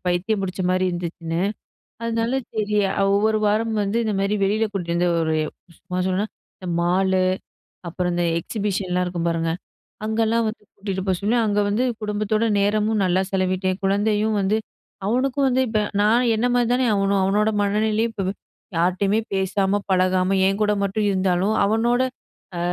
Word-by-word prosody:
பைத்தியம் 185 Hz, +4 st, 0 dB
பிடிச்சமாரி 185 Hz, 0 st, 0 dB
இருந்துச்சுன்னு. 170 Hz, -1 st, -4 dB, 0.6 s
அதனால 230 Hz, +1 st, -1 dB, 0.2 s
சரி 210 Hz, -1 st, -1 dB, 0.2 s
அ -, -, -1 dB
ஒவ்வொரு 215 Hz, +2 st, +2 dB
வாரமும் 215 Hz, 0 st, +1 dB
வந்து 200 Hz, +3 st, -1 dB
இந்தமாரி 200 Hz, -1 st, 0 dB
வெளில 215 Hz, +3 st, +1 dB
கூட்டிட்டு 170 Hz, -4 st, -2 dB
வந்து, 175 Hz, +1 st, +2 dB
ஒரு 160 Hz, -1 st, 0 dB, 0.5 s
சும்மா 180 Hz, 0 st, -4 dB
சொண்ணோன்னா, 190 Hz, +3 st, 0 dB, 0.3 s
இந்த 185 Hz, -, -6 dB
மாலு, 185 Hz, +2 st, +2 dB, 0.7 s
அப்புறம் 180 Hz, +1 st, -2 dB
இந்த 175 Hz, 0 st, +1 dB, 0.2 s
எக்ஸிபிஷன்லாம் 190 Hz, -3 st, -2 dB
இருக்கும் 175 Hz, -1 st, -2 dB
பாருங்க. 165 Hz, 0 st, 0 dB, 0.5 s
அங்கலாம் 225 Hz, +1 st, +1 dB
வந்து 215 Hz, -, -8 dB
கூட்டிட்டு 195 Hz, -2 st, -4 dB
போக 190 Hz, -, +2 dB
சொல்லி, 220 Hz, +4 st, +1 dB
அங்க 205 Hz, -1 st, +1 dB
வந்து 215 Hz, +5 st, +1 dB, 0.2 s
குடும்பத்தோட 210 Hz, +1 st, 0 dB, 0.2 s
நேரமும் 210 Hz, +1 st, +1 dB
நல்லா 185 Hz, +1 st, +2 dB
செலவிட்டேன். 185 Hz, 0 st, 0 dB
குழந்தையும் 210 Hz, +2 st, +1 dB
வந்து 200 Hz, +3 st, +1 dB, 0.5 s
அவனுக்கும் 265 Hz, +4 st, +1 dB
வந்து 255 Hz, +1 st, +2 dB
இப்ப 215 Hz, -1 st, +1 dB, 0.2 s
நான் 235 Hz, +4 st, +3 dB
என்னமாரி 245 Hz, +2 st, +2 dB
தானே 255 Hz, +1 st, +2 dB
அவனும், 195 Hz, 0 st, +2 dB
அவனோட 205 Hz, +3 st, +2 dB
மனநிலையும் 215 Hz, +2 st, +1 dB
இப்ப 195 Hz, -2 st, -2 dB, 0.5 s
யார்ட்டயுமே 185 Hz, +5 st, +2 dB
பேசாம, 195 Hz, +1 st, +1 dB
பழகாம, 185 Hz, 0 st, +2 dB
என்கூட 210 Hz, +2 st, +1 dB
மட்டும் 200 Hz, +2 st, 0 dB
இருந்தாலும், 190 Hz, +2 st, +1 dB
அவனோட 235 Hz, +4 st, +2 dB, 0.6 s
அ -, -, -2 dB
200 Hz, 145 wpm, -22 LUFS, 185-220 Hz, 0.7 s, நான்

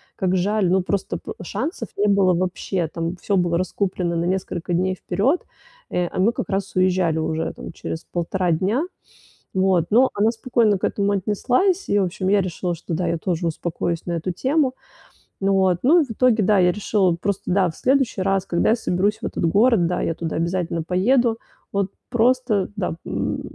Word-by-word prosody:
как 185 Hz, -1 st, 0 dB
жаль". 200 Hz, 0 st, +1 dB
Ну 185 Hz, 0 st, +2 dB
просто 195 Hz, +1 st, -2 dB
п -, -, -8 dB
шансов 305 Hz, -, -4 dB
не 205 Hz, -, +2 dB
было 195 Hz, -2 st, +4 dB
вообще, 180 Hz, -1 st, -1 dB
там 165 Hz, +2 st, -4 dB
всё 200 Hz, -, -1 dB
было 175 Hz, -1 st, +1 dB
раскуплено 185 Hz, -1 st, -1 dB
на 165 Hz, 0 st, 0 dB
несколько 180 Hz, -1 st, -2 dB
дней 185 Hz, +2 st, +1 dB
вперед, 205 Hz, -, 0 dB, 0.5 s
э, 180 Hz, -, 0 dB
а -, -, -5 dB
мы 205 Hz, +5 st, +4 dB
как -, -, -4 dB
раз 195 Hz, 0 st, -2 dB
уезжали 185 Hz, -3 st, +2 dB
уже, 160 Hz, 0 st, -1 dB
там, -, -, -9 dB
через 165 Hz, 0 st, -6 dB
полтора 175 Hz, +1 st, -1 dB
дня. 195 Hz, -, +1 dB, 0.7 s
Вот. 185 Hz, -3 st, +2 dB
Но 250 Hz, +5 st, +5 dB
она 210 Hz, +2 st, +3 dB
спокойно 230 Hz, -3 st, +2 dB
к -, -, -6 dB
этому 200 Hz, 0 st, +1 dB
отнеслась, 255 Hz, -, +1 dB
и 205 Hz, -, +2 dB
в 200 Hz, -, +3 dB
общем 185 Hz, +1 st, -3 dB
я 200 Hz, 0 st, +4 dB
решила, 180 Hz, 0 st, -3 dB
что, 165 Hz, 0 st, -5 dB
да, 175 Hz, +2 st, -1 dB
я 170 Hz, -, 0 dB
тоже 170 Hz, 0 st, -2 dB
успокоюсь 165 Hz, 0 st, -2 dB
на 175 Hz, -, -2 dB
эту 170 Hz, +2 st, -2 dB
тему. 265 Hz, -, +1 dB, 0.7 s
Вот. 190 Hz, -2 st, +2 dB
Ну, 300 Hz, +8 st, +6 dB
от, 290 Hz, -, -2 dB
в -, -, -7 dB
итоге, 230 Hz, -1 st, +3 dB
да, 200 Hz, +1 st, +4 dB
я 180 Hz, -1 st, +4 dB
решила 195 Hz, -2 st, +1 dB
просто, 200 Hz, +2 st, -3 dB
да, 185 Hz, -1 st, +3 dB
в -, -, -18 dB
следующий 260 Hz, -6 st, +1 dB
раз, 195 Hz, 0 st, +1 dB
когда 170 Hz, -, +1 dB
я -, -, +4 dB
соберусь 205 Hz, -1 st, 0 dB
в -, -, -5 dB
этот -, -, -3 dB
город, 200 Hz, +1 st, +4 dB
да, 180 Hz, -, -1 dB
я -, -, 0 dB
туда 165 Hz, -1 st, -4 dB
обязательно 170 Hz, -1 st, -1 dB
поеду, 225 Hz, +7 st, +2 dB, 0.3 s
вот 200 Hz, -1 st, +1 dB, 0.2 s
просто, 240 Hz, -4 st, +2 dB
да, 180 Hz, -4 st, -2 dB
м, -, -, -2 dB
190 Hz, 195 wpm, -22 LUFS, 175-215 Hz, 0.7 s, Ну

